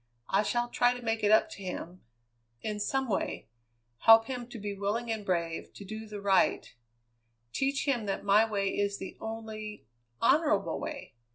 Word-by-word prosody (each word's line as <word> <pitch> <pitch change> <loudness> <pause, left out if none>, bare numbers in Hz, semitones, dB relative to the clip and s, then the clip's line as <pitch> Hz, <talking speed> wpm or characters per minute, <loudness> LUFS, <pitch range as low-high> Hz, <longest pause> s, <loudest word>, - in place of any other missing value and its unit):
I 195 - +3
shall 240 +3 0
try 245 0 +2
to 245 - -8
make 225 -1 0
it 205 - +4
up 215 0 +5
to 200 - -9
him 180 -1 -6 0.6
in 210 -1 -3
some 265 +5 0
way; 195 - -2 0.5
help 225 +4 +8
him 245 -1 -5
to 240 - -9
be 205 -1 -4
willing 210 +4 -2
and 220 -2 -3
brave, 170 -4 -2
to 200 - -9
do 220 +2 -7
the 210 -1 -7
right; 195 -1 +2 0.8
teach 275 +1 0
him 240 -6 +1
that 195 - -2
my 210 +3 +5
way 200 -2 0
is 200 0 -1
the 190 - -7
only 220 -1 -6 0.3
honourable - - +2
way. - - -6
215 Hz, 175 wpm, -30 LUFS, 200-225 Hz, 0.8 s, help